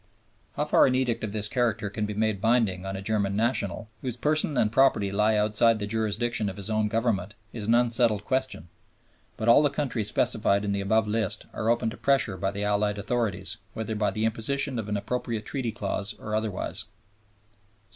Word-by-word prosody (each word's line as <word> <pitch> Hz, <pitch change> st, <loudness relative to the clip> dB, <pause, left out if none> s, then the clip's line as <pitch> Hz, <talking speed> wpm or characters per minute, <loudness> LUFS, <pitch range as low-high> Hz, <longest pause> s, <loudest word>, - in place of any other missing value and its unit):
How 150 Hz, -, 0 dB
far 150 Hz, -, +5 dB
an 130 Hz, -, +1 dB
edict 120 Hz, -3 st, 0 dB
of 110 Hz, -, -2 dB
this 105 Hz, 0 st, +1 dB
character 110 Hz, -3 st, 0 dB
can 105 Hz, +1 st, -3 dB
be 105 Hz, -, -5 dB
made 110 Hz, -2 st, 0 dB
binding 110 Hz, -6 st, +1 dB
on 95 Hz, -, -4 dB
a 95 Hz, -, -6 dB
German 100 Hz, -2 st, 0 dB
national, 110 Hz, -1 st, -1 dB
whose 125 Hz, -2 st, -3 dB
person 150 Hz, +1 st, +1 dB
and 110 Hz, -3 st, +2 dB
property 115 Hz, -6 st, +3 dB
lie 105 Hz, +2 st, +2 dB
outside 110 Hz, +2 st, +3 dB
the 105 Hz, -, -3 dB
jurisdiction 110 Hz, +1 st, -1 dB
of 95 Hz, -, -8 dB
his 100 Hz, +2 st, -4 dB
own 110 Hz, 0 st, +1 dB
Government, 105 Hz, -3 st, -1 dB, 0.2 s
is 105 Hz, -3 st, -5 dB
an 115 Hz, -, +4 dB
unsettled 115 Hz, -3 st, +2 dB
question; 130 Hz, -10 st, -2 dB, 0.7 s
but 110 Hz, -, -3 dB
all 120 Hz, +5 st, +7 dB
the 145 Hz, -, +3 dB
countries 130 Hz, -7 st, -1 dB
specified 105 Hz, -4 st, +1 dB
in 100 Hz, -, -1 dB
the 100 Hz, 0 st, -1 dB
above 110 Hz, +2 st, +2 dB
list 110 Hz, -2 st, +1 dB
are 110 Hz, -, -1 dB
open 115 Hz, -1 st, +1 dB
to -, -, -9 dB
pressure 135 Hz, -8 st, +1 dB
by 95 Hz, +1 st, -1 dB
the 100 Hz, +1 st, -4 dB
Allied 105 Hz, 0 st, +1 dB
authorities, 100 Hz, -2 st, -2 dB, 0.2 s
whether 110 Hz, 0 st, -4 dB
by 105 Hz, -1 st, +1 dB
the 110 Hz, 0 st, -2 dB
imposition 125 Hz, +4 st, -1 dB
of 105 Hz, -2 st, -5 dB
an 105 Hz, -, 0 dB
appropriate 110 Hz, +1 st, -3 dB
Treaty 130 Hz, -3 st, -2 dB
clause 100 Hz, -2 st, -3 dB
or 105 Hz, -, -6 dB
otherwise. 105 Hz, -2 st, -2 dB
110 Hz, 195 wpm, -27 LUFS, 105-120 Hz, 0.7 s, all